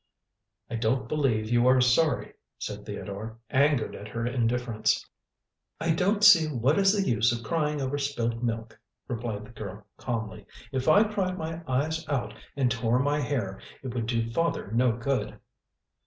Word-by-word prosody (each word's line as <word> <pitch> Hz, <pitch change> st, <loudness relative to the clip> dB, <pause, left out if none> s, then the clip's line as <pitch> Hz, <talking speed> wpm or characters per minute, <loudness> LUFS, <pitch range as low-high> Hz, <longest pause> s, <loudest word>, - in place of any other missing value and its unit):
"I 115 Hz, -, -4 dB
don't 115 Hz, +1 st, 0 dB
believe 115 Hz, -7 st, 0 dB
you 120 Hz, +1 st, +4 dB
are 130 Hz, 0 st, +6 dB
sorry," 125 Hz, +5 st, +2 dB, 0.2 s
said -, -, -6 dB
Theodore, 110 Hz, +3 st, -6 dB
angered 140 Hz, -2 st, +2 dB
at 105 Hz, -, -8 dB
her 115 Hz, +2 st, -3 dB
indifference. 120 Hz, -2 st, 0 dB, 0.7 s
"I 165 Hz, -, +1 dB
don't 200 Hz, +6 st, +1 dB
see 170 Hz, -6 st, +8 dB
what 140 Hz, -, +1 dB
is 195 Hz, -1 st, +5 dB
the 200 Hz, -2 st, 0 dB
use 115 Hz, 0 st, +3 dB
of 115 Hz, -1 st, -3 dB
crying 150 Hz, 0 st, 0 dB
over 135 Hz, +1 st, -2 dB
spilt 120 Hz, -5 st, -2 dB
milk," 115 Hz, -1 st, -3 dB, 0.3 s
replied 115 Hz, -3 st, -4 dB
the 110 Hz, -, -14 dB
girl 105 Hz, -3 st, -8 dB
calmly. 110 Hz, -4 st, -4 dB, 0.2 s
"If 130 Hz, -1 st, -2 dB
I 205 Hz, +7 st, +7 dB
cried 195 Hz, -4 st, -1 dB
my 165 Hz, 0 st, -4 dB
eyes 155 Hz, +5 st, 0 dB
out 140 Hz, -4 st, -1 dB, 0.2 s
and 130 Hz, -3 st, +1 dB
tore 115 Hz, +1 st, +1 dB
my 145 Hz, +3 st, +1 dB
hair, 120 Hz, -9 st, -2 dB, 0.2 s
it 130 Hz, -3 st, -5 dB
would 115 Hz, -2 st, -2 dB
do 115 Hz, -1 st, -1 dB
father 165 Hz, -7 st, -1 dB
no 120 Hz, +2 st, +3 dB
good." 125 Hz, +4 st, -2 dB
125 Hz, 165 wpm, -27 LUFS, 115-150 Hz, 0.7 s, see